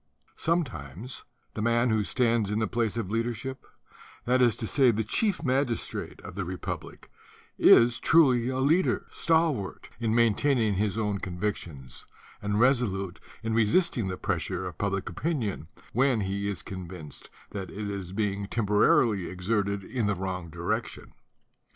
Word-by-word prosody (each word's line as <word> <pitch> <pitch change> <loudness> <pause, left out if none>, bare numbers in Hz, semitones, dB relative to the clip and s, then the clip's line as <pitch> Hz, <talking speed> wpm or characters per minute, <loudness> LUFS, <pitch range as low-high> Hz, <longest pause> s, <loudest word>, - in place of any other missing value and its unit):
Sometimes 125 - -2 0.3
"the 110 - -4
man 115 +1 +2
who 110 -1 +2
stands 115 -2 +1
in 105 - -1
the 110 - +1
place 115 0 -1
of 105 -4 -3
leadership," 120 +3 -3 0.6
that 125 +1 +3
is 120 -4 +4
to 115 - -4
say, 130 +3 +4
the 110 -1 +1
chief 200 - 0
magis 130 -2 0
trate - - -6
of - - -9
the 95 +1 -3
republic, 90 +1 -6 0.5
is 120 0 +6
truly 130 -7 +4
a 130 - -2
leader, 155 +8 +2
stalwart 160 - 0
in 115 -1 0
maintaining 115 0 +3
his 105 +1 0
own 105 -2 -1
convictions 90 -8 -5 0.3
and 105 0 0
resolute 105 -8 +1 0.2
in 110 0 -1
resisting 115 - +2
the 95 -1 -3
pressure 95 -1 -2
of 90 -3 -7
public 100 -2 -1
opinion, 110 - -2 0.3
when 125 -2 +3
he 100 +1 -2
is 95 -3 -4
convinced 90 -6 -8 0.2
that 95 -2 -5
it 105 +1 -5
is 100 -3 -5
being 100 -1 -1
temporarily 105 -2 +3
ex 90 0 -8
erted 100 -3 0
in 120 -5 -1
the 105 - +1
wrong 90 -2 -4
direction. 85 +2 -4
105 Hz, 150 wpm, -28 LUFS, 95-120 Hz, 0.6 s, is